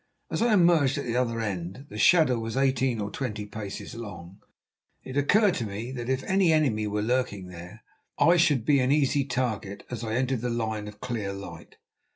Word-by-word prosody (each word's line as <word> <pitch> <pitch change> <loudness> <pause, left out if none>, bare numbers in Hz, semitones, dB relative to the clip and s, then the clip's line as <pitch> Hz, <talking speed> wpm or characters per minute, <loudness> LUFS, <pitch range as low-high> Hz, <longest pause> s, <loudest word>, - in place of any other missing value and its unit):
As - - -1
I 230 -2 +4
emerged 165 -7 +4
at 140 - -3
the 120 -1 -2
other 120 -2 0
end—the 100 +4 -5
shadow 155 -9 +5
was 115 +2 -4
eighteen 130 -3 +1
or 100 -1 -3
twenty 105 -5 -4
paces 105 -1 -7
long—it 100 +4 -12
occurred 195 +8 +4
to - - -2
me 105 +5 -5
that 120 -2 -5
if 130 0 0
any 190 -3 +3
enemy 130 -9 +2
were 105 0 -1
lurking 110 -6 -1
there, 90 +5 -11 0.3
I 175 +1 +5
should 145 -9 +3
be 145 -2 +4
an 130 +1 +2
easy 145 -1 +2
target 120 -7 -3
as 120 -1 -4
I 110 0 -2
entered 130 -1 0
the 125 - -2
line 110 -3 -2
of 105 0 -11
clear 110 -5 -3
light. 85 -5 -10
120 Hz, 190 wpm, -27 LUFS, 105-135 Hz, 0.3 s, shadow